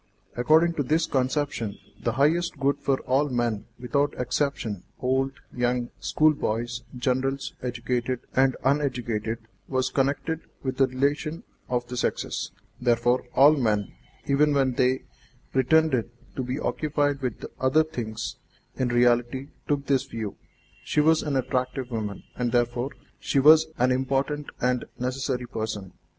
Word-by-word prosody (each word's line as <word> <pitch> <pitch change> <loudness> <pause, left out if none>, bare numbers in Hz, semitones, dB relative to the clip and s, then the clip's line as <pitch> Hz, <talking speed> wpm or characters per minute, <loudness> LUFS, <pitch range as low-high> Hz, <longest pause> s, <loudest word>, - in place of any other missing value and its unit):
According 160 +7 +4
to - - +2
this 155 +5 +2
conception, 130 -5 -1 0.2
the 115 - 0
highest 155 +5 +2
good 140 +1 +1
for 135 -1 0
all 140 +3 +1
men 120 -4 -1
without 140 +4 0
exception 125 -6 -1 0.2
old, 130 +1 +1 0.2
young, 125 0 0
schoolboys, 120 -6 +1 0.2
generals, 130 +2 -1
educated 125 0 -2
and 130 0 +4
uneducated, 125 -5 0 0.3
was 130 -1 0
connected 145 +4 0 0.2
with 130 -1 -2
the 135 - +5
relation 145 +5 -1 0.3
of 125 -1 0
the 125 - -5
sexes; 120 - -1 0.3
therefore, 120 +1 +2
all 145 +3 +8
men, 105 - 0 0.3
even 145 +1 +3
when 135 -2 +3
they 130 +1 +2 0.5
pretended 130 -2 +3 0.3
to - - -1
be 125 +2 -3
occupied 145 -3 0
with 125 -4 -3
other 130 +5 +4
things, 115 -8 -5 0.4
in 130 - +1
reality 120 +2 +2 0.2
took 145 -1 0
this 135 -1 +2
view. 110 -6 -5 0.5
She - - 0
was 160 +1 +5
an 145 -2 -2
attractive 130 0 -1
woman, 105 -3 -3
and 120 -1 -1
therefore 120 +2 +1 0.3
she - - -1
was 155 +3 +7
an 125 +1 +3
important 135 +3 0
and 125 0 +1
necessary 125 0 -2
person. 110 -5 -4
130 Hz, 135 wpm, -26 LUFS, 120-140 Hz, 0.5 s, all